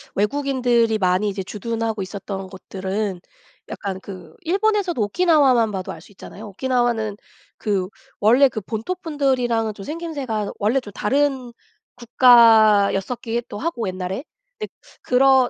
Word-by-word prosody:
외국인들이 245 -1 +1
많이 185 +1 +1
이제 195 -1 -4
주둔하고 225 +1 -3
있었던 195 0 -6
곳들은 190 0 -4 0.5
약간 195 -2 -5
그 180 -5 -11
일본에서도 390 - 0
오키나와만 260 - +3
봐도 190 -2 -4
알 - - -10
수 - - -18
있잖아요. 210 +2 -11
오키나와는 240 -1 0 0.4
그 195 -3 -1 0.3
원래 250 +6 +5
그 220 - -5
본토분들이랑은 250 - -1
좀 200 - -10
생김새가 285 -10 -4
원래 220 +6 +1
좀 215 -6 -11
다른 265 +1 0 0.4
국가였었기에 230 -2 +4
또 - - -6
하고 280 - -2
옛날에. 185 +5 -4 0.4
네. 430 - -4 0.3
그러 260 0 +4
225 Hz, 315 characters per minute, -21 LUFS, 200-265 Hz, 0.5 s, 원래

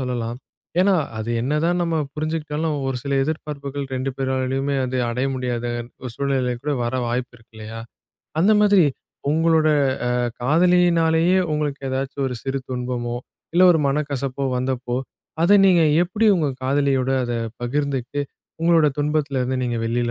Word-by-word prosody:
சொல்லலாம். 120 -2 -3 0.4
ஏன்னா, 195 0 +4 0.2
அது 110 +2 -3
என்னதான் 160 +6 +1
நம்ம 165 -1 0 0.2
புரிஞ்சுட்டாலும் 155 0 -2
ஒரு 135 -1 -1
சில 140 +1 -3
எதிர்பார்ப்புகள் 145 -2 -4
2 130 +1 -2
பேராலயுமே 135 +1 -1
வந்து 130 0 -2
அடைய 125 +3 -1
முடியாதன் 120 -2 -3 0.3
சூழ்நிலை 135 -3 0
கூட 150 - -1
வர 120 +2 -2
வாய்ப்பிருக்கு 120 -1 -5
இல்லையா? 110 +1 -7 0.6
அந்த 205 +5 +5
மாதிரி, 205 -5 +5 0.5
உங்களோட 160 0 +3 0.5
அ - - +1 0.2
காதலியினாலயே 170 +2 +3
உங்களுக்கு 150 -2 -2
ஏதாச்சும் 135 +1 -2
ஒரு 125 - -5
சிறு 135 0 -2
துன்பமோ, 125 -1 -3 0.4
இல்ல 180 - +5
ஒரு 160 - +2
மனக்கசப்போ 140 -2 -2
வந்தப்போ, 125 -1 -2 0.5
அத 200 +5 +6
நீங்க 175 -3 +5 0.2
எப்டி 210 +5 0
உங்க 155 -4 +1
காதலியோட 135 -1 +1
அத 120 - -3 0.3
பகிர்ந்துட்டு 140 +1 -2 0.4
உங்களோட 165 -2 +4
துன்பத்துலருந்து 140 -4 0
நீங்க 120 -1 -1
வெளில 120 +1 0
140 Hz, 130 wpm, -22 LUFS, 125-155 Hz, 0.6 s, அத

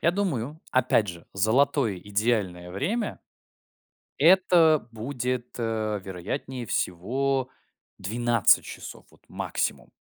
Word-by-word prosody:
Я 170 - +3
думаю, 155 - -2
опять 120 -4 +3
же, 85 -2 -8
золотое 115 +2 +2
идеальное 100 -3 -1
время 210 - -2 1.0
это 165 -3 +5
будет, 125 +1 -3
э, 110 -3 -1
вероятнее 115 +7 -5
всего, 130 +10 -1 0.5
12 115 +2 +3
часов, - - -9
вот, - - -24
максимум. - - -3
120 Hz, 95 wpm, -26 LUFS, 105-140 Hz, 1.0 s, это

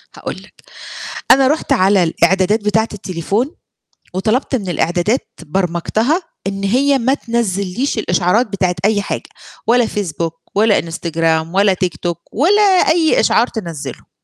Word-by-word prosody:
هاقول - - -6
لَك، - - -15 0.8
أنا 270 -1 +6
رُحت 305 +3 0
على 190 0 +4
الإعدادات 190 +5 +2
بتاعة 220 +2 +2
التليفون، 200 - -2 0.6
وطلبت 220 +9 0
من 205 -7 -2
الإعدادات 175 - 0
برمجتها 190 - 0 0.2
إن 195 0 -3
هي 270 +7 +2
ما 260 +2 +2
تنزّليش 230 -1 -2
الإشعارات 180 +4 +1
بتاعة 190 -3 -1
أي 205 0 +2
حاجة، - - -5 0.4
ولا 240 +1 +4
فيسبوك 165 -5 -4
ولا 210 0 +4
إنستجرام 165 0 -1
ولا 200 0 +4
تيك 185 -1 -2
توك 175 -1 -3
ولا 380 - +3
أي 350 -5 +4
إشعار 235 - +3
تنزّله. 165 - -7
200 Hz, 130 wpm, -17 LUFS, 175-240 Hz, 0.8 s, أنا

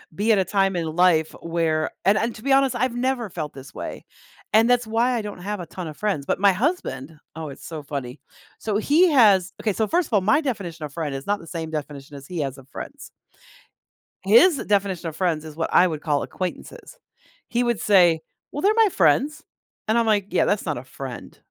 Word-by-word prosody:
be 210 +5 +1
at 215 - +4
a 190 - +2
time 195 0 +1
in 170 -2 -1
life 170 -3 +3
where 165 -2 0 0.2
and 200 +2 +4
and, 230 +1 -1
to 215 - -12
be 275 -1 +2
honest, 270 -2 +3
I've 245 0 0
never 245 -2 -1
felt 155 -4 -5
this 135 0 -12
way, - - -7 0.5
and 225 +2 +5
that's 245 -1 +3
why 230 +3 +1
I 230 - -1
don't 205 -3 -7
have 205 +2 -4
a 175 - -5
ton 175 +1 -7
of 155 - -9
friends, 195 -10 -1
but - - 0
my 200 0 +5
husband 185 - -2 0.2
oh, 160 -2 -6
it's 140 - -11
so 160 -2 -6
funny. 140 -2 -6 0.4
So, 210 -2 -1
he 310 +11 +4
has 205 -9 +5
okay, 215 - 0
so, 220 +2 0
first 345 +5 +1
of - - -11
all, 205 - +4
my 215 +11 +3
definition 180 - -4
of 140 - -10
friend 150 -4 -3
is 135 - -6
not 205 0 0
the - - -13
same 160 -1 -5
definition 145 -2 -6
as 140 0 -11
he 180 -2 -5
has 135 -1 -3
of 135 - -17
friends - - -9 1.1
His 240 - +6
definition 195 -7 -1
of 155 - -11
friends 165 -4 -1
is 155 -1 -9
what 165 0 -2
I 185 - +6
would 155 -3 -4
call 145 -3 0
acquaintances. 185 - -7 0.5
He 240 +1 0
would 240 -3 0
say, 175 -6 +4 0.3
"Well, 290 - -4
they're 400 - +4
my 450 -2 +5
friends." 280 - +2 0.4
And 220 +2 +2
I'm, 235 - +3
like, 205 -3 +2
"Yeah, - - +2
that's 205 - 0
not 150 -4 -2
a 120 - -7
friend." 130 -1 -9
190 Hz, 225 wpm, -23 LUFS, 155-230 Hz, 1.1 s, His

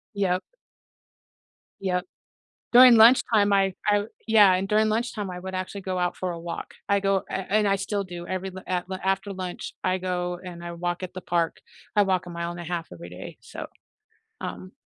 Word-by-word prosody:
Yep. 185 -2 +1 1.4
Yep. 180 -1 -1 0.7
During 250 0 +10
lunchtime, 220 -3 +6
I 195 -2 +3
I 205 0 +3 0.2
Yeah, 210 -4 +7
and 190 +1 -1
during 215 +1 +3
lunchtime, 220 -2 -1
I 180 0 -6
would 190 0 -6
actually 185 +2 -4
go 185 -1 -3
out 180 0 0
for 185 -1 -2
a 170 - -5
walk. 170 0 -6
I 200 0 +3
go 195 -1 +1
and 190 - -3
and 210 -1 +3
I 195 - +3
still 200 +1 -2
do 175 -1 -8
every 185 0 -3
l 190 - -7
af 180 -1 -1 0.2
after 195 +1 0
lunch, 185 -1 -6
I 185 0 +1
go 180 -1 -2
and 175 -1 -8
I 170 - -5
walk 175 +1 -3
at 185 - -5
the 185 - -5
park. 170 -2 0 0.4
I 205 - +7
walk 185 -2 +1
a - - -7
mile 170 0 -4
and 175 - -8
1/2 170 0 -4
every - - -9
day, - - -9
so - - -8 0.7
um 185 +1 -6
185 Hz, 195 wpm, -26 LUFS, 180-200 Hz, 1.4 s, During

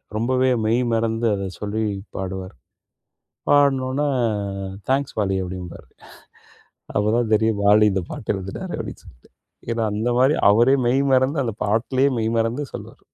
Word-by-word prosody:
ரொம்பவே 130 +3 +1 0.2
மெய் 115 +3 +2
மறந்து 115 +1 0
அத 100 -1 -3 0.2
சொல்லிப் 105 -1 -3
பாடுவாரு. 95 0 -5 1.0
பாடுன 140 -2 +4
ஒன்ன, 140 +3 -1 0.8
"தேங்க்ஸ் 135 +1 0
வாலி" 95 -2 0
அப்படீம்பாரு. 90 -1 -8 1.1
அப்பதான் 110 +2 +1
தெரியும், 110 -1 +1
"வாலி 105 +1 +6
இந்தப் 95 -3 -3
பாட்டு 105 - -3
எழுதினாரு." 95 0 -6
அப்படீன்னு - - -7
சொல்லிட்டு. - - -19 0.4
ஏன்னா 115 -1 -1
அந்த 115 +3 -1
மாதிரி, 135 +4 +4 0.2
அவரே 120 +6 +5
மெய் 135 +3 +3
மறந்து 135 +3 +2
அந்தப் 115 -2 -5
பாட்டுலேயே 130 +6 +1
மெய் 110 +1 -1
மறந்து 115 +6 -1
சொல்லுவாரு. - - -9
115 Hz, 135 wpm, -22 LUFS, 100-130 Hz, 1.1 s, வாலி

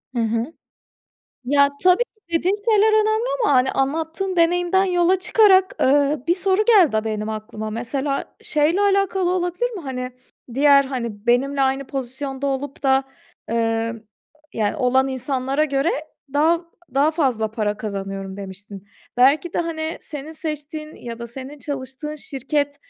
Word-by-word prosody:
Hı - - 0
hı. 230 +7 -1 0.9
Ya, 280 +2 +4
tabii 365 +6 +5
ki - - -63 0.3
dediğin 370 +4 +1 0.2
şeyler 430 +1 +4
önemli 435 +2 +1 0.2
ama 285 - +3
hani, 255 +1 +4
anlattığın 325 +7 -1
deneyimden 355 +3 +3
yola 360 0 +3
çıkarak, 380 0 +4
ııı, 285 +1 +2
bir 345 - +3
soru 385 +2 +2
geldi 365 - +5
a 215 - 0
benim 215 -1 -3
aklıma. 215 0 -5
Mesela 270 +5 -3
şeyle 305 +6 +1
alakalı 390 -2 +2
olabilir 360 +6 -1
mi: 390 -7 -7
Pani, 255 -2 -4 0.4
diğer, 280 0 +6
hani, 235 -5 -5
benimle 270 +3 +2
aynı 265 0 0
pozisyonda 270 +1 -4
olup 275 +1 -3
da, 265 0 +3 0.5
ııı, 225 -1 -1 0.5
yani, 215 +5 -1
olan 260 0 +2
insanlara 265 +2 -1
göre 280 +3 +1 0.4
daha 330 +4 +2 0.3
daha 285 +3 +4
fazla 250 -9 0
para 210 -2 -1
kazanıyorum, 195 -2 -5
demiştin. 200 0 -10 0.3
Belki 285 +7 +4
de - - -1
hani, 325 -1 -3
senin 300 +1 -7
seçtiğin 305 0 -6
ya 235 -1 -8
da 235 - -6
senin 265 +4 -9
çalıştığın 280 +2 -5
şirket 285 0 -2
280 Hz, 145 wpm, -22 LUFS, 245-335 Hz, 0.9 s, diğer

